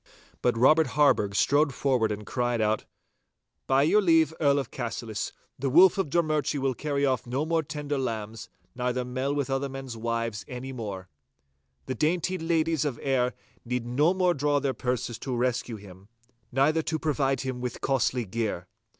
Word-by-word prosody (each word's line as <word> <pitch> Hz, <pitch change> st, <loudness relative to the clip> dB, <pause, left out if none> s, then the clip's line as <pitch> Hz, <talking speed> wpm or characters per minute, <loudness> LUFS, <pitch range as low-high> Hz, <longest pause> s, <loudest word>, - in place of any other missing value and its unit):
But 120 Hz, -2 st, +1 dB
Robert 155 Hz, +6 st, +5 dB
Harburgh 105 Hz, -9 st, +3 dB
strode 145 Hz, +4 st, +3 dB
forward 125 Hz, -6 st, +1 dB
and 105 Hz, 0 st, -5 dB
cried 120 Hz, +1 st, -1 dB
out, 110 Hz, 0 st, +1 dB, 0.8 s
'By 135 Hz, +1 st, +4 dB
your 210 Hz, +8 st, +4 dB
leave, 165 Hz, -4 st, +4 dB
Earl 145 Hz, -2 st, +3 dB
of 135 Hz, -4 st, -3 dB
Cassillis, 115 Hz, -3 st, -4 dB, 0.3 s
the 135 Hz, +1 st, 0 dB
Wolf 180 Hz, +7 st, +6 dB
of 190 Hz, -, 0 dB
Drummurchie 155 Hz, -2 st, +1 dB
will 135 Hz, -1 st, 0 dB
carry 140 Hz, +1 st, -1 dB
off 130 Hz, -4 st, 0 dB
no 135 Hz, +5 st, -1 dB
more 165 Hz, 0 st, +1 dB
tender 145 Hz, -1 st, -4 dB
lambs, 110 Hz, -5 st, -4 dB, 0.2 s
neither 125 Hz, 0 st, -1 dB
mell 130 Hz, +2 st, -2 dB
with 145 Hz, -2 st, -1 dB
other 135 Hz, +1 st, -1 dB
men's 135 Hz, -2 st, -7 dB
wives 115 Hz, -2 st, -2 dB
any 125 Hz, +1 st, -6 dB
more. 100 Hz, -6 st, -6 dB, 0.8 s
The -, -, -3 dB
dainty 175 Hz, +5 st, 0 dB
ladies 165 Hz, -2 st, +1 dB
of 140 Hz, -6 st, -2 dB
Ayr 130 Hz, -2 st, +1 dB, 0.3 s
need 125 Hz, -1 st, -2 dB
no 145 Hz, +9 st, +2 dB
more 180 Hz, -1 st, +3 dB
draw 145 Hz, -1 st, +1 dB
their 140 Hz, -2 st, -1 dB
purses 125 Hz, -2 st, -3 dB
to 130 Hz, -2 st, -3 dB
rescue 120 Hz, -1 st, -1 dB
him, 100 Hz, -2 st, -13 dB, 0.4 s
neither 145 Hz, +5 st, +3 dB
to 160 Hz, 0 st, -2 dB
provide 140 Hz, -4 st, 0 dB
him 130 Hz, -2 st, -4 dB
with 125 Hz, -1 st, -4 dB
costly 130 Hz, -2 st, 0 dB
gear. 105 Hz, -4 st, -3 dB
130 Hz, 170 wpm, -27 LUFS, 120-150 Hz, 0.8 s, Wolf